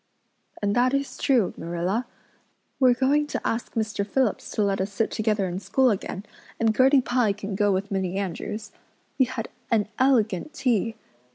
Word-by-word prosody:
"And 205 0 +1
that 250 +2 +3
is 275 0 -2
true, 245 -8 +2
Marilla. 175 +8 -2 0.7
We're 255 -2 +5
going 285 +4 +2
to - - -3
ask 230 +1 -2
Mr. 215 -2 -1
Phillips 230 +2 0
to 210 - +1
let 195 -1 +1
us 195 +2 -2
sit 215 +2 -1
together 215 -3 0
in 180 +1 -3
school 260 +4 +2
again, 195 0 -4 0.3
and 225 -1 +2
Gertie 265 +2 +5
Pye 245 -4 +1
can 200 0 -6
go 205 +1 +2
with 195 +2 -1
Minnie 190 -1 -1
Andrews. 200 +3 -4 0.5
We 260 - +6
had 245 -2 -5 0.2
an 215 -3 +2
elegant 255 - +2
tea. 235 -5 +1
220 Hz, 170 wpm, -25 LUFS, 200-255 Hz, 0.7 s, We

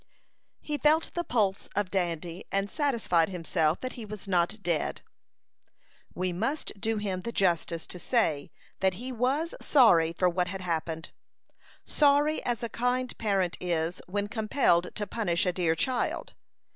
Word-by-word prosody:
He 295 -1 -3
felt 310 +2 +3
the 345 - -1
pulse 210 - 0
of 200 -2 0
Dandy, 175 -2 -2
and 195 +1 0
satisfied 225 - +1
himself 165 -3 0
that 255 - -4
he 235 - -8
was 210 -2 -8
not 180 +2 +1
dead. 170 -4 -1 1.1
We 180 0 -1
must 230 - -2
do 225 -1 0
him 195 -3 -2
the 235 - -4
justice 170 -4 0
to 180 - -6
say 165 - +1 0.3
that 190 -1 +2
he 250 +7 -5
was 265 +7 0
sorry 175 - +5
for 180 +2 +1
what 180 0 +1
had 190 +1 -5
happened 165 -1 -3 0.7
sorry 295 +1 +3
as 240 -1 -2
a - - 0
kind 250 +2 -1
parent 195 -5 0
is 170 0 -1
when 205 +2 -1
compelled 215 -5 +1
to 210 - -2
punish 190 -5 0
a 180 - +1
dear 170 -3 +1
child. 250 +8 -1
195 Hz, 155 wpm, -28 LUFS, 175-240 Hz, 1.1 s, sorry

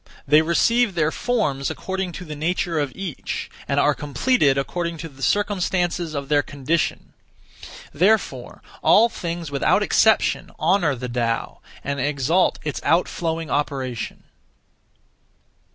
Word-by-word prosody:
They 150 +2 +6
receive 205 +6 +2
their 160 -2 +2
forms 155 - -1
according 190 -1 -4
to 180 - -7
the 155 -2 -7
nature 165 +1 -1
of 145 -2 -1
each, 185 -6 -5 0.2
and - - +1
are - - +4
completed 145 - +1
according 170 +4 -2
to 165 - -6
the 135 -2 -17
circumstances 180 -4 0
of 140 -1 -4
their 145 0 +3
condition. 145 +4 -2 0.8
Therefore 200 +8 0 0.2
all 230 +2 +5
things 170 -6 -5
without 140 -2 +2
exception - - +3
honour 165 -3 +2
the 125 0 -5
Tao, 120 -1 -2 0.2
and 140 0 -3
exalt 145 +6 +1
its 150 -2 -4
outflowing 165 0 0
operation. 135 -5 -3
160 Hz, 125 wpm, -22 LUFS, 140-180 Hz, 0.8 s, They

